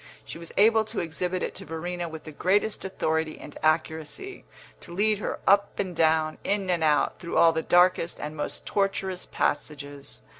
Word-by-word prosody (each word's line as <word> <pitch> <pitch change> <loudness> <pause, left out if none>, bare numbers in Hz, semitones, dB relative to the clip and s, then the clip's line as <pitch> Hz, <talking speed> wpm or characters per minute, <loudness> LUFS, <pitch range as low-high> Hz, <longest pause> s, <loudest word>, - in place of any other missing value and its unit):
She - - -8
was 170 - -8
able 220 +2 +5
to 215 0 -4
exhibit 180 +2 -2
it - - -3
to - - -6
Verena 175 +2 -4
with 160 -1 -8
the 155 - -9
greatest 200 +7 +1
authority 160 -4 -1
and 145 - -11
accuracy, 160 - -1 0.3
to - - -10
lead 210 +3 +1
her - - -3
up 200 +1 +4
and 185 -3 -2
down, 160 -1 +2
in 195 -2 0
and 170 -2 +1
out, 150 -1 +2
through 170 - -3
all 165 - +7
the 160 0 -1
darkest 175 0 +3
and 150 +1 -5
most 150 - -4
tortuous 195 -2 -1
passages. 145 -1 -3
170 Hz, 180 wpm, -27 LUFS, 155-195 Hz, 0.3 s, all